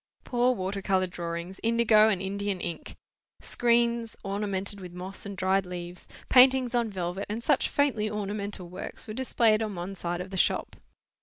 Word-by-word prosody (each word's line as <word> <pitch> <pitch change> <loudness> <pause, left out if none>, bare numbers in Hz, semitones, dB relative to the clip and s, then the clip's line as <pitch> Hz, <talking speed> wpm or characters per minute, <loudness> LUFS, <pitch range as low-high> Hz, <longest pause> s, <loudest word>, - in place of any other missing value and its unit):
Poor 245 0 +2
water 195 0 -3
colour 190 -1 +2
drawings, 170 +1 -5
indigo 225 -2 +5
and 190 -3 0
Indian 200 0 -2
ink; 175 -1 -6 0.4
screens, 235 -1 +1
ornamented 200 0 -2
with 180 -1 -9
moss 185 +3 -7
and 200 -1 -7
dried 190 +1 +2
leaves; 180 -1 -8 0.2
paintings 255 -1 +6
on 235 -2 +1
velvet, 185 0 -4
and 220 +3 -4
such - - +2
faintly 250 -7 +1
ornamental 205 -2 -4
works 180 - -7
were 215 - -6
displayed 230 -3 +2
on 215 -3 -3
one 180 +3 -5
side 175 -2 -3
of 185 +1 -6
the 190 - -4
shop. - - +1
200 Hz, 165 wpm, -28 LUFS, 185-225 Hz, 0.4 s, paintings